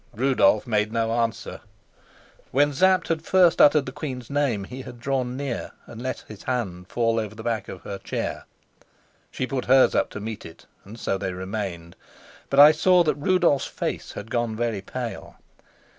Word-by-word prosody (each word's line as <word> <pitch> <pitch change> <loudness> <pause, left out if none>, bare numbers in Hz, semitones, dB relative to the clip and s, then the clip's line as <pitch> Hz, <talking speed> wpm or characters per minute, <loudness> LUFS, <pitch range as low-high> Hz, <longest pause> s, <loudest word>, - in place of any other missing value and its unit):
Rudolf 130 -2 +3
made 105 -3 0
no 115 0 0
answer. 115 -1 -2 0.9
When 145 +2 +2
Sapt 185 +5 +3
had 165 -1 0
first 180 0 +4
uttered 145 0 +6
the 130 - -5
queen's 130 -4 -6
name, 140 -8 0
he 125 +6 -8
had 120 -2 -10
drawn 130 -1 -2
near 140 -4 -4
and 115 - -10
let 130 +1 -4
his 105 -2 -11
hand 95 -9 -3
fall 115 0 +1
over 110 -1 -5
the 110 - -9
back 115 -4 -2
of 95 - -8
her 100 -1 -6
chair. - - -4 0.8
She - - -3
put 130 -1 -3
hers 130 +1 +5
up - - +1
to - - -7
meet 110 +1 -6
it, 80 - -13 0.2
and 110 +4 -11
so 95 - -1
they 95 -1 -3
remained. 95 -3 -5 0.5
But 140 - +2
I 145 +1 +11
saw 180 +3 +4
that 155 - +2
Rudolf's 170 -2 +2
face - - -4
had 110 +2 -8
gone 120 -2 -1
very 115 -3 -2
pale. 120 +4 -6
120 Hz, 180 wpm, -24 LUFS, 110-140 Hz, 0.9 s, I